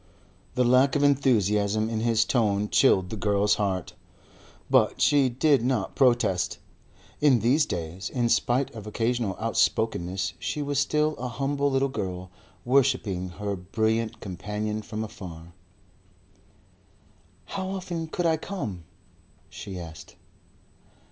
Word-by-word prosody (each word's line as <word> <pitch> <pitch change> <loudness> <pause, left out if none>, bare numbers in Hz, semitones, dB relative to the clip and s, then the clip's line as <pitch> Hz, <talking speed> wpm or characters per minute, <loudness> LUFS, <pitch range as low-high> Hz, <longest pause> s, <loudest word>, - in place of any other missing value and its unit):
The 125 - +3
lack 130 +3 +4
of 145 - +2
enthusiasm 110 -6 +2
in 110 -1 -2
his 115 -1 +2
tone 105 -4 +1
chilled 95 -9 +3
the - - -3
girl's 105 0 +2
heart. 95 -4 -2 0.7
But - - +3
she 140 -3 +4
did 135 +1 +2
not 125 -6 -1
protest. 110 - +2 0.6
In 145 -4 +5
these 135 +7 +3
days, 85 +2 -4
in 120 -2 0
spite 125 +3 +1
of 110 -2 -9
occasional 115 -2 -1
outspokenness 95 -5 0
she 150 - -3
was 145 -1 -1
still 150 +2 +1
a 125 - -4
humble 140 +3 -1
little 135 0 +1
girl 90 -8 -5 0.3
worshipping 120 -8 +1
her 100 -1 -2
brilliant 110 +4 -1
companion 105 +3 -4
from 110 +1 -5
afar. 85 -5 -9 1.9
"How 190 -1 -4
often 180 -4 -4
could 175 +2 -3
I 160 -1 +3
come?" 110 - -6 0.7
she 95 -2 -7
asked. 80 -2 -10
110 Hz, 125 wpm, -26 LUFS, 100-135 Hz, 1.9 s, In